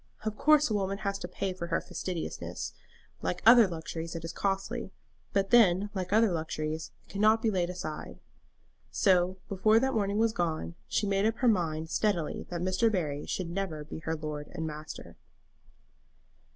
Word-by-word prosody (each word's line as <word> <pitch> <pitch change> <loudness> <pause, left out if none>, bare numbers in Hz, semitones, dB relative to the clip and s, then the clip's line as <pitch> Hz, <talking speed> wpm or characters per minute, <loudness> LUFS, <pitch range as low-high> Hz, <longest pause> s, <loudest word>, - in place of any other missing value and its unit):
Of 215 -1 -1
course 300 +5 +5
a 220 - -2
woman 195 -1 0
has 200 -1 -2
to - - -5
pay 185 +1 -3
for 170 -2 -5
her 170 - +1
fastidiousness. 175 -3 -5 0.5
Like 180 - -2
other 230 -1 +9
luxuries, 165 -1 -5
it 165 0 -5
is 165 - -5
costly; 200 +4 -2 0.4
but 195 -1 0
then, 205 -4 +5
like 185 -2 -3
other 220 -1 +4
luxuries, 155 -1 -3 0.2
it - - -16
cannot 215 +3 +4
be 225 - +3
laid 180 -3 0
aside." 175 -4 -6 0.7
So, 185 -2 +3
before 215 +3 +4
that 265 +2 +1
morning 205 -2 0
was 225 0 +3
gone, 155 - -2
she 210 - 0
made 200 +1 +2
up 225 - 0
her 250 - +1
mind 160 -6 +1
steadily 185 -8 0
that 175 -1 -3
Mr. 185 +5 +2
Barry 150 -7 -2
should 175 -3 -3
never 170 -5 -3
be 155 - -8
her 160 0 -2
lord 150 -1 -5
and 160 -2 -3
master. 155 0 -8
185 Hz, 175 wpm, -30 LUFS, 165-210 Hz, 0.7 s, other